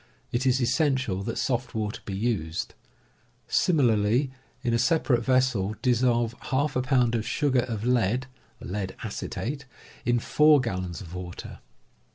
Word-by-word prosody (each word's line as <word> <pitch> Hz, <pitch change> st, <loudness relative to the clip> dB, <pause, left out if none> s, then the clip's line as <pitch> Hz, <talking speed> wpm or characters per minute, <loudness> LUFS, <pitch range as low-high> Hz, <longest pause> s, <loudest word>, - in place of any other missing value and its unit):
It 125 Hz, +2 st, 0 dB
is 130 Hz, 0 st, +3 dB
essential 130 Hz, -, +1 dB
that 115 Hz, +3 st, -4 dB
soft 125 Hz, -2 st, -1 dB
water 105 Hz, -1 st, -3 dB
be 100 Hz, -, -4 dB
used. 95 Hz, -7 st, -2 dB, 0.7 s
Similarly, 125 Hz, -, +2 dB, 0.3 s
in 120 Hz, -2 st, +1 dB
a 115 Hz, -, +2 dB
separate 125 Hz, -2 st, +2 dB
vessel, 125 Hz, -6 st, +2 dB
dissolve 120 Hz, -2 st, +2 dB
^ 135 Hz, -1 st, 0 dB
pound 125 Hz, -3 st, +2 dB
of 115 Hz, -2 st, 0 dB
sugar 135 Hz, +1 st, +1 dB
of 110 Hz, -2 st, -4 dB
lead 125 Hz, 0 st, +2 dB, 0.3 s
(lead 95 Hz, 0 st, -4 dB
acetate) 140 Hz, +3 st, -4 dB, 0.4 s
in 120 Hz, 0 st, +2 dB
4 150 Hz, +5 st, +5 dB
gallons 90 Hz, -8 st, -3 dB
of 85 Hz, -3 st, -10 dB
water. 90 Hz, -1 st, -7 dB
120 Hz, 135 wpm, -26 LUFS, 105-130 Hz, 0.7 s, 4